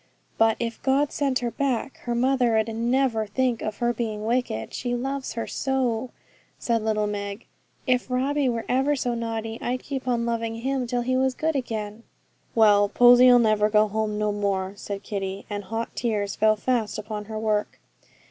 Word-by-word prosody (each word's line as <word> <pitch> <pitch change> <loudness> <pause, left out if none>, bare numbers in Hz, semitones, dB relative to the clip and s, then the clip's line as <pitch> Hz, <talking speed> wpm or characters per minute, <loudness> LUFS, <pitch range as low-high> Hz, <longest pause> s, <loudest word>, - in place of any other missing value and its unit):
'But 225 0 +4
if 230 -1 -4
God 275 +2 +2
sent 275 -3 0
her 235 - -1
back, 270 +1 -2
her 240 -1 -1
mother 250 -2 +2
'ud 220 0 +1
never 235 -1 +1
think 245 +2 0
of 215 -1 -4
her 240 -1 +1
being 215 -3 -3
wicked, 230 - -1
she 245 -1 -2
loves 270 +2 -3
her 230 - -3
so,' 255 -3 -1 0.5
said 230 -2 0
little 215 -1 +1
Meg. 205 +1 -4 0.4
'If 250 -1 +1
Robbie 270 +2 +1
were 230 -2 -2
ever 270 +3 +2
so 250 -3 -1
naughty, 225 -1 -4
I'd 255 +1 -2
keep 265 -2 -5
on 235 -2 +1
loving 230 -1 -2
him 260 +2 -2
till 245 0 -1
he 255 +1 0
was 260 0 +1
good 320 0 -1
again.' 220 -4 -4 0.5
'Well, 205 -2 +5
Posy'll 245 +2 +7
never 215 -2 +3
go 215 0 +4
home 210 0 -2
no 210 0 0
more,' 200 -2 -1
said 200 0 -6
Kitty; 195 -1 -4
and 205 -1 -4
hot 225 +3 -4
tears 210 -4 -1
fell 215 0 +4
fast 230 -1 -1
upon 210 -1 -5
her 220 +1 -6
work. 215 -1 -1
230 Hz, 180 wpm, -25 LUFS, 215-255 Hz, 0.5 s, Posy'll